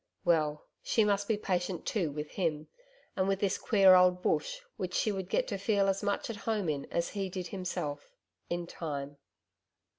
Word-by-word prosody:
Well, 155 -3 +2 0.2
she 225 - +2
must 200 -1 +1
be 220 - +1
patient 180 -3 -2
too 175 -9 0
with 150 +1 -5
him, 155 -5 -1 0.5
and 190 0 +1
with 195 -1 +1
this 200 -1 0
queer 195 -4 +6
old 180 0 +5
Bush - - 0
which 180 -1 -4
she 215 - +2
would 190 -2 -4
get - - +1
to 200 - -3
feel 200 -1 +2
as 195 0 +1
much 205 -1 -1
at 230 - -5
home 210 -6 +1
in 140 -2 -2
as 170 0 -1
he 195 -2 -3
did 180 -2 -5
himself 180 - -4 0.4
in 175 0 -2
time. 145 -4 -5
185 Hz, 185 wpm, -31 LUFS, 165-200 Hz, 0.5 s, queer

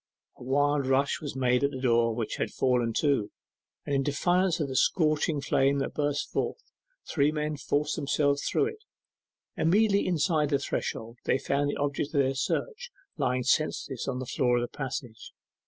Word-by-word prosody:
A - - -11
wild 145 +1 +1
rush 135 +2 +1
was 145 -3 -5
made 125 0 +2
at 140 - +3
the 130 - -6
door, 115 -3 +2
which 115 -2 -3
had - - -1
fallen 125 -3 +1
to, 135 -4 +1 0.6
and 145 - -3
in - - +2
defiance 175 +5 +1
of 150 - 0
the 130 - -5
scorching 155 -1 +2
flame 140 +1 +2
that 135 - -2
burst 145 -1 -1
forth, - - -1 0.5
three 145 -1 +2
men 150 0 -2
forced 150 +1 -1
themselves 140 -1 +1
through - - +1
it. 440 -1 -12 0.7
Immediately 200 +4 +3
inside 160 -3 +1
the 140 - +2
threshold 115 -4 -4
they - - +2
found 140 +1 0
the - - -2
object 145 +1 -2
of - - +4
their 135 0 +1
search 480 - -2 0.3
lying 125 0 0
senseless 135 -1 0
on 135 -2 -2
the 130 - -4
floor 125 0 +1
of - - +1
the 120 - -5
passage. 125 -4 -6
140 Hz, 180 wpm, -28 LUFS, 130-150 Hz, 0.7 s, of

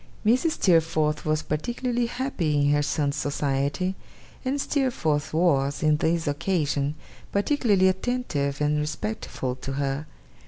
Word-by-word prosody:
Mrs. 255 +9 +3
Steerforth 160 -4 +2
was 155 0 +1
particularly 240 - -1
happy 230 - -1
in 145 0 +3
her 145 0 +3
son's 145 -1 0
society, 145 +5 -1 0.5
and 270 +2 -1
Steerforth 170 - 0
was, 145 -4 +2
on 155 -1 +4
this 165 +1 +1
occasion, 145 -2 0 0.4
particularly 205 -3 +3
attentive 185 - -1
and 150 0 +2
respectful 130 -3 -3
to 135 +1 -5
her. 140 +2 -2
155 Hz, 120 wpm, -25 LUFS, 145-200 Hz, 0.5 s, on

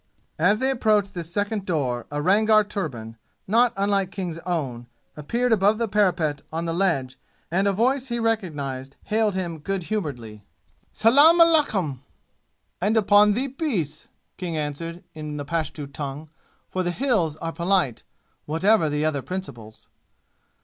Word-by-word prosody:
As 190 +6 +4
they 265 +3 +1
approached 215 -5 +1
this 170 -2 -6
second 205 +2 -1
door 135 -10 -2
a 145 0 -3
Rangar 215 +4 +4
turban, 135 - -5 0.3
not 235 +4 +4
unlike 200 -1 +1
King's 180 -4 -5
own, 130 -9 -3 0.3
appeared 235 +12 -1
above 210 0 +4
the 230 0 -1
parapet 175 -8 +1
on 165 +1 -3
the 165 - -1
ledge 150 -8 0 0.3
and 190 +4 +2
a - - +4
voice 255 +6 +1
he 235 -1 -2
recognized 145 - -2
hailed 215 -2 +1
him 170 -4 -3
good 195 +4 -3
humoredly. 125 - -5 0.5
"Salaam 285 +10 +6
aleikoum!" 255 - +3 0.8
"And 210 +4 +2
upon 205 0 +5
thee 250 +6 -1
be 270 - -7
peace!" 180 - -3 0.3
King 175 -3 -4
answered 165 +4 -4
in 150 -1 -6
the 145 - -5
Pashtu 155 -1 -3
tongue, 145 +2 -7 0.4
for 185 - -2
the 175 - -1
"Hills" 180 - 0
are 165 +1 -5
polite, 170 - +1 0.5
whatever 165 +2 +3
the 150 +1 -1
other 150 -3 0
principles. 130 - -8
180 Hz, 150 wpm, -24 LUFS, 150-215 Hz, 0.8 s, Salaam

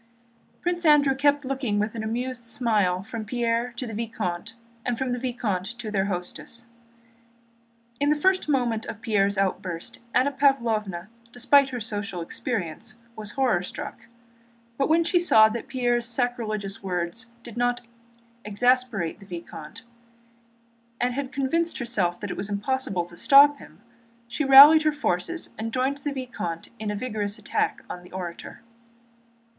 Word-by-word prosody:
Prince 350 0 -1
Andrew 295 -3 +5
kept 285 +1 +2
looking 260 -6 -1
with 210 +1 0
an 225 -2 -4
amused 245 +3 -3
smile 215 -6 0
from 220 +2 -6
Pierre 235 +2 -1
to 245 +2 -5
the 225 - -7
vicomte 215 -2 -4 0.3
and 245 -2 -1
from 260 0 -2
the 245 - -1
vicomte 235 -4 -3
to 225 -3 -6
their 195 -2 +1
hostess. 200 +5 -3 1.3
In 285 +1 +2
the 300 - +4
first 375 +2 +1
moment 240 -5 0
of 215 - -6
Pierre's 200 -3 +1
outburst 185 -3 -2 0.2
Anna 265 +3 +3
Pávlovna, 225 -9 +1 0.2
despite 270 +3 +4
her 250 -1 -4
social 205 -4 -4
experience, 210 +3 -4 0.2
was 215 -1 -7
horror 255 -10 +2
struck. 190 - -8 0.7
But 275 +4 0
when 330 +2 +4
she 345 +2 +2
saw 220 -11 +6
that 235 +3 -5
Pierre's 240 -3 0
sacrilegious 225 -5 -2
words 185 +4 -3 0.2
had 235 - -9
not 245 0 0 0.6
exasperated 215 -4 +1
the 200 - -15
vicomte, 175 +3 -9 1.2
and 245 0 +1
had 270 0 -4
convinced 295 +5 0
herself 200 -8 -1
that 205 -3 -4
it - - -5
was 205 - -3
impossible 205 -3 -1
to 175 - -13
stop 285 - +6
him, - - -15 0.5
she 270 +5 -2
rallied 280 +3 +10
her 310 0 +2
forces 295 - -2
and 225 +1 -3
joined 260 +3 0
the 290 - -3
vicomte 245 -11 -5
in 215 -1 -3
a 210 - -2
vigorous 210 -2 -3
attack 215 - -1
on 180 - -7
the 180 - -16
orator. 180 -2 -7
235 Hz, 150 wpm, -25 LUFS, 205-265 Hz, 1.3 s, rallied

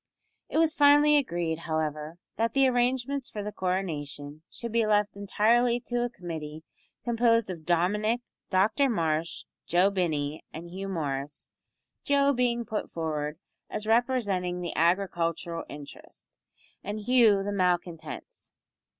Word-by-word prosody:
It - - -2
was 320 -1 +4
finally 290 0 +6
agreed, 170 - 0
however, 155 -1 -3 0.2
that 230 +1 0
the 270 -1 +5
arrangements 255 +2 0
for 210 - -5
the 210 - -4
coronation 155 -6 -3
should 235 -1 -6
be 230 -1 +2
left 210 -1 +2
entirely 235 +4 +2
to 240 0 -2
a 245 - -1
committee 160 -7 -7 0.4
composed 230 -3 +2
of 160 -3 -9
Dominick, 210 +7 +1 0.3
Dr 210 +9 +3
Marsh, 165 -6 -1 0.2
Joe 180 +4 +4
Binney, 155 -6 -1
and 170 +2 -8
Hugh 195 +2 -5
Morris 145 -5 -4 0.5
Joe 280 0 +3
being 240 -2 0
put 215 -1 -3
forward 150 -2 -3 0.3
as 215 - -4
representing 215 -7 +1
the 175 - -4
agricultural 170 -1 0
interest, 145 -1 -11 0.5
and 210 +2 -4
Hugh 225 -4 +4
the 205 - -2
malcontents. 175 -4 -2
195 Hz, 130 wpm, -28 LUFS, 165-235 Hz, 0.5 s, finally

